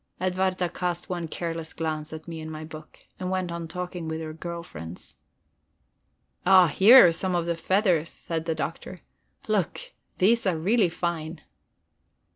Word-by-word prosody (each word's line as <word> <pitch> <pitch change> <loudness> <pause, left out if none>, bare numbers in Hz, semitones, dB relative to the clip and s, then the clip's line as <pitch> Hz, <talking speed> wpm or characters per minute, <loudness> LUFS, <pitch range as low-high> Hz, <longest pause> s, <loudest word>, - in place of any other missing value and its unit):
Edwarda 185 0 0
cast 175 0 -3
one 175 -2 -3
careless 165 0 -5
glance 155 -1 -3
at 160 +1 -9
me 165 -1 -6
and 155 - -7
my 155 0 -7
book, 155 0 -12
and 185 0 -3
went 185 -2 -1
on 170 -1 -5
talking 180 0 -5
with 160 0 -3
her 155 -1 -6
girl 170 +1 -6
friends. 80 - -10 1.3
"Ah, 185 -1 +7
here 220 - +8
are 170 - +5
some 180 +2 -1
of 170 -1 0
the 170 0 -1
feathers," 170 -1 +2
said 165 -1 -4
the 165 -1 -1
Doctor. - - -5 0.5
"Look, - - -1 0.2
these 225 +3 +3
are 175 -3 +1
really 200 +4 +2
fine." 165 -1 -4
170 Hz, 160 wpm, -26 LUFS, 160-185 Hz, 1.3 s, here